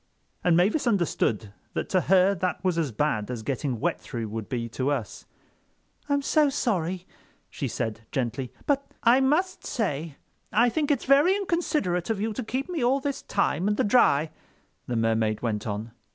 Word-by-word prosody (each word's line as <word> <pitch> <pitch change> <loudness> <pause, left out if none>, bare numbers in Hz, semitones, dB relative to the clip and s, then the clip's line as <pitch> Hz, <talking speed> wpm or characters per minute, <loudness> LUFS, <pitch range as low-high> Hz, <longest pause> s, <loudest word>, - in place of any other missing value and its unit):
And 170 -2 +4
Mavis 210 - +2
understood 135 - 0 0.2
that - - -2
to 185 - +3
her 190 +3 +4
that 185 0 -2
was 185 -2 +1
as 150 -6 -1
bad 110 -3 -1
as 120 -3 -4
getting 130 -1 -2
wet 90 - -1
through 110 +5 -5
would 110 -1 -5
be 120 -3 -2
to 130 +4 -1
us. 125 -9 -3 0.8
"I'm 285 0 +1
so 300 0 +3
sorry," 185 - -1 0.5
she 140 - -3
said 115 -2 -3
gently, 125 0 -2
"but—" 280 -1 -1
"I 240 +3 +6
must 310 +8 +1
say 165 - -2 0.4
I 235 +4 +4
think 290 +5 -1
it's 290 - +1
very 285 +8 +5
inconsiderate 315 - -1
of 220 -3 0
you 220 +1 -1
to 255 - -4
keep 260 +4 -3
me 340 -7 -2
all 260 +3 +3
this 280 0 -3
time 190 -3 0
in 210 - +2
the 260 - +1
dry," 160 - +4 0.6
the 120 - -2
Mermaid 110 -1 +1
went 110 -2 -2
on. 105 +2 -4
180 Hz, 180 wpm, -26 LUFS, -, 0.8 s, I